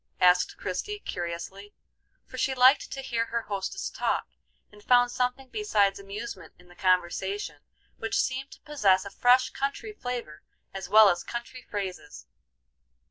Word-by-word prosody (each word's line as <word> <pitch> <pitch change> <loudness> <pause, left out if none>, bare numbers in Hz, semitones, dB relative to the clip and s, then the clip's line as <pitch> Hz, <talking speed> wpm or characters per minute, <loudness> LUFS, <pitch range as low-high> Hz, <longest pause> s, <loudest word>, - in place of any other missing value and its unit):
asked 180 0 +4
Christie, 200 - -3
curiously; 180 - -6 0.5
for - - -9
she 265 - +1
liked 255 +2 +5
to 270 - -5
hear 230 -3 -1
her 235 0 -2
hostess 200 - -4
talk, - - -1 0.4
and 210 0 -17
found 245 +1 +4
something 250 +2 -1
besides 205 - +1
amusement 200 +1 -8
in 175 0 -20
the 175 - -16
conversation, 185 -1 0 0.4
which 225 - -2
seemed 265 +1 -1
to - - -17
possess 200 -11 +2
a 200 - -7
fresh 250 +1 +4
country 280 +10 -3
flavor 240 - -5 0.3
as 190 -2 -6
well 215 +1 +8
as 175 -3 +1
country 240 +1 -6
phrases. 195 -5 -6
210 Hz, 145 wpm, -27 LUFS, 190-250 Hz, 0.5 s, well